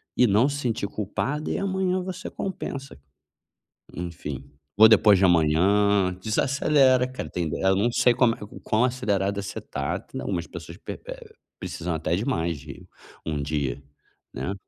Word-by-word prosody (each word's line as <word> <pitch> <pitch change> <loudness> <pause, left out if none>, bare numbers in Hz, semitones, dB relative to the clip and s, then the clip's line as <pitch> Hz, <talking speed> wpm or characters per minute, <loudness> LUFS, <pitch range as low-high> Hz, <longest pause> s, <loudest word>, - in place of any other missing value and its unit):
e 125 - +5
não 110 +7 +4
se 145 - -3
sentir 115 -6 -2
culpada, 110 +9 -3
e - - -1
amanhã 190 -1 0
você 185 0 -6
compensa. 140 - -6 0.9
Enfim. 80 -6 -6 0.3
Ou 110 - +10
depois 105 -2 +6
de 95 - +5
amanhã. 90 +4 +3
Desacelera, 130 +3 +3
cara. 130 - -6
Tem 85 -3 -2
eu 95 +4 +2
não 115 +5 +1
sei 125 +1 +4
como 120 -1 +3
é - - -11
o 105 - -10
quão 110 +2 +1
acelerado 100 -6 0
é - - -2
você 100 - -6
está. 70 0 -3
Tem - - -8
algumas 85 -3 -3
pessoas 85 -1 -9
pe - - -7
eh, - - -9 0.3
precisam 85 0 -4
até 80 +1 -1
de 100 - -2
mais 85 - -1
de 70 -1 -11 0.4
1 75 -2 -2
dia, 70 -2 -2 0.5
né. 95 - -3
100 Hz, 170 wpm, -25 LUFS, 85-125 Hz, 0.9 s, Ou